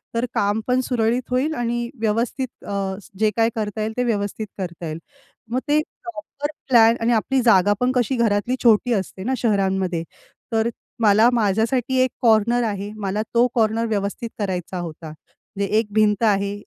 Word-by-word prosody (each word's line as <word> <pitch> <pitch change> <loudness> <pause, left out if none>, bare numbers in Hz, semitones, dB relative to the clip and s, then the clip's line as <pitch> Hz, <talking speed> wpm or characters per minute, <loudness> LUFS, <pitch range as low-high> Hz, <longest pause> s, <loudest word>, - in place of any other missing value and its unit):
तर 230 +2 +1
काम 205 +2 +1
पण 250 0 +2
सुरळीत 240 -1 +1
होईल 265 +5 +1
आणि 240 0 -2
व्यवस्थित 230 +4 -2
अ, 195 -1 -2 0.2
जे 215 0 +4
काही 225 0 +3
करता 215 -1 -3
येईल 220 +1 -2
ते 250 - +2
व्यवस्थित 215 -2 -2
करता 175 -3 -5
येईल. 155 +1 -5 0.5
मग 250 - +1
ते 295 +1 +3 0.3
प्रॉपर 310 -4 -5 0.2
प्लॅन 230 -2 +6
आणि 235 +1 +2
आपली 260 +4 +1
जागा 205 -4 +5
पण 250 +1 +2
कशी 255 +1 +1
घरातली 230 +1 +1
छोटी 235 +1 +4
असते 190 -2 -3
ना 255 +5 -1
शहरांमध्ये 190 -6 0 0.5
तर 225 +1 +2 0.3
मला 215 +2 +5
माझ्यासाठी 230 +4 +1
एक 255 - +1
कॉर्नर 235 +1 +3
आहे 205 -2 -3
मला 205 0 -2
तो 235 +1 +5
कॉर्नर 225 0 +2
व्यवस्थित 205 +2 -2
करायचा 185 -2 -3
होता. 165 -2 -7
म्हणजे 195 +6 -8
एक 225 - -2
भिंत 215 0 +2
आहे 200 -2 +2
220 Hz, 165 wpm, -22 LUFS, 200-240 Hz, 0.5 s, प्लॅन